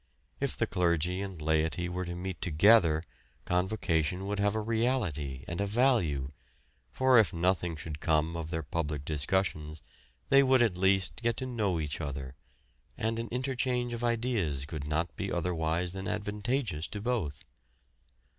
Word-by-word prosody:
If - - -2
the - - +2
clergy 90 +1 0
and 95 -4 -6
laity 80 +3 +1
were 90 +1 -3
to 85 0 -5
meet 90 -2 -5
together, 85 -1 +5 0.4
Convocation 90 -2 0
would 100 0 -2
have 100 +1 +2
a - - +1
reality 105 - -1
and 85 +3 -3
a 100 - 0
value, 100 - +2 0.6
for 130 - +5
if 110 - +4
nothing 90 0 0
should 75 0 -6
come 80 0 +1
of 80 -1 -4
their 80 -1 -2
public 75 -2 -3
discussions 75 0 -1 0.5
they 135 0 +7
would 130 -2 +5
at 110 -6 +1
least 95 +3 +2
get 115 -1 0
to 130 - -2
know 105 -9 0
each 75 -2 -3
other, 70 -2 -5 0.6
and 115 +1 -1
an 115 - -3
interchange 125 -1 -1
of 120 0 -4
ideas 115 - 0
could 75 -1 -6
not 80 +3 -1
be 95 - -3
otherwise 85 0 0
than 95 0 -5
advantageous 105 - -2
to 105 - -6
both. 100 - -2
90 Hz, 155 wpm, -30 LUFS, 80-110 Hz, 0.6 s, they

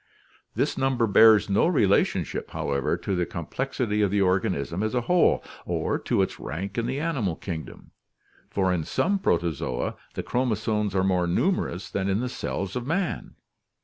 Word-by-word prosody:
This - - 0
number 130 -3 +2
bears 110 0 +6
no 100 +9 +3
relationship, 105 - +1
however, 70 -2 -1
to 95 - -2
the 90 - +1
complexity 110 - -2
of 100 - +3
the 100 +2 +1
organism 90 -3 0
as 110 +3 -1
a 125 - +2
whole, 175 +8 +3 0.2
or - - -1
to - - +1
its - - -4
rank 90 +7 -5
in 115 - -1
the 130 +3 -2
animal 135 - -1
kingdom, 80 -4 -7 0.6
for 95 -2 +1
in 85 -3 -1
some 200 - 0
Protozoa 85 - -1 0.2
the - - -3
chromosomes 110 -4 0
are 95 - +2
more 90 -2 +2
numerous 90 - 0
than 95 0 -1
in 100 +2 +1
the 125 +1 -2
cells 100 -5 -4
of 125 0 -3
man. 175 +3 -2
100 Hz, 165 wpm, -26 LUFS, 90-125 Hz, 0.6 s, bears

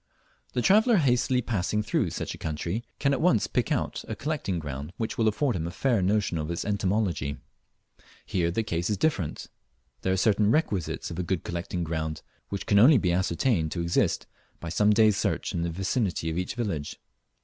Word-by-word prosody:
The 125 - 0
traveller 220 +3 +5
hastily 125 -4 +2
passing 105 -1 -1
through 105 - 0
such - - -4
a - - -11
country 85 +8 -3
can 140 - +2
at 135 - -1
once 145 - +3
pick - - -1
out - - -1
a - - -4
collecting 145 - -2
ground 75 +1 -6
which 110 - -2
will 115 - +2
afford 115 +4 +1
him 85 -1 -2
a - - -3
fair 120 +3 +1
notion 95 -3 +1
of 75 +1 -3
its 85 - -3
entomology. 95 -8 0 0.9
Here 85 -3 0
the 100 +7 -1
case 85 -4 -2
is 105 - 0
different. 95 - -1 0.6
There 95 - 0
are 95 - +1
certain 105 +1 +3
requisites 105 - 0
of 85 - -5
a - - 0
good 90 0 -2
collecting 85 +1 -3
ground 80 -1 -3 0.3
which 100 -1 -4
can 100 -2 +4
only 130 +6 +8
be 90 -5 +1
ascertained 85 -1 +1
to 85 - -2
exist 85 0 +1 0.3
by 85 - -6
some 105 +5 +3
days' 105 -1 +4
search - - -1
in 85 - -1
the 85 - -1
vicinity 95 -1 -1
of 80 - -4
each 90 - -3
village. 100 -12 -3
95 Hz, 195 wpm, -27 LUFS, 85-115 Hz, 0.9 s, only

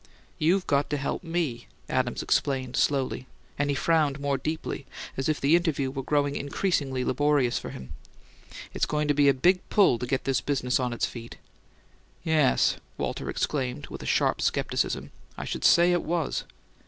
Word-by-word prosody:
"You've 180 +5 +2
got 140 0 +1
to 145 - 0
help 140 +5 -3
me," 165 -8 -2 0.2
Adams 130 -1 -1
explained 130 -3 0
slowly; 130 -2 0 0.3
and 145 0 +1
he 140 - +1
frowned 150 -1 +2
more 140 -1 0
deeply, 155 -2 -4 0.3
as 135 +2 -1
if 155 - 0
the 145 +4 +4
interview 150 -6 0
were 135 0 -4
growing 145 +1 0
increasingly 140 -4 -1
laborious 140 -2 +2
for - - -7
him. 65 - -9 0.8
"It's - - 0
going 150 0 0
to - - +5
be 145 -1 +4
a - - +5
big 180 +7 +3
pull 190 - +4
to 125 - -4
get 135 +1 -1
this 135 -1 0
business 130 -3 0
on 125 -1 -1
its 120 - 0
feet." 115 -1 -8 0.9
"Yes!" 155 -5 +3 0.2
Walter - - -3
exclaimed 130 - -2
with - - -8
a - - -6
sharp - - +2
skepticism. - - -1 0.3
"I - - -5
should - - -4
say 175 +1 +6
it 175 -1 +2
was!" 165 -2 -2
140 Hz, 175 wpm, -27 LUFS, 130-155 Hz, 0.9 s, say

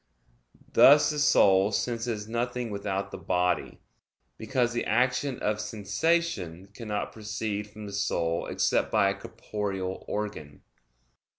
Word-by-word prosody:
Thus 145 +2 +7
the 150 - -3
soul 100 -7 +5
senses 115 -1 -2
nothing 120 0 -2
without 100 -1 -3
the - - -7
body, 90 -1 -1 0.5
because 120 +1 0
the 120 - -1
action 125 +3 +1
of 105 0 -1
sensation 105 - -1
cannot 105 -3 -4
proceed 105 -1 -4
from 105 0 -10
the 100 - -8
soul 85 -4 -1
except - - +1
by 100 0 +3
a - - -4
corporeal 100 -2 -5
organ. 80 -9 -5
105 Hz, 120 wpm, -28 LUFS, 100-120 Hz, 0.5 s, Thus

